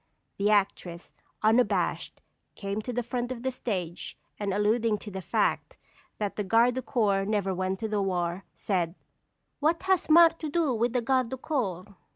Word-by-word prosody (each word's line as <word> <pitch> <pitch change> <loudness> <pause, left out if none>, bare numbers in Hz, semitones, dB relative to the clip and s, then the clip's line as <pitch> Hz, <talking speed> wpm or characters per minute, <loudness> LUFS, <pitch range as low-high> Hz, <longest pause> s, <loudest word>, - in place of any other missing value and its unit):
The 205 +1 +2
actress, 190 -4 0 0.3
unabashed, 225 +3 +1 0.3
came 200 +1 -3
to 250 - -5
the 245 0 -2
front 245 +1 -3
of 240 -2 -6
the 260 - 0
stage, 185 -9 -4 0.2
and 205 -1 -1
alluding 210 +2 +2
to 205 0 -9
the 190 0 -5
fact - - -1 0.4
that 205 -2 -3
the 210 - 0
Gardes 230 +5 +4
du 260 - -3
Corps 205 -7 +1
never 200 -2 0
went 185 +1 -2
to 215 -2 -1
war, 180 -1 -1
said: 180 -4 -1 0.6
"What 315 +4 +1
has 380 -3 +1
Mars 335 +1 +8
to 310 - -4
do 310 -3 +1
with 235 +1 0
the 245 -2 0
Gardes 255 -1 +1
du 265 - -4
Corps?" 205 - -3
215 Hz, 175 wpm, -28 LUFS, 195-250 Hz, 0.6 s, Mars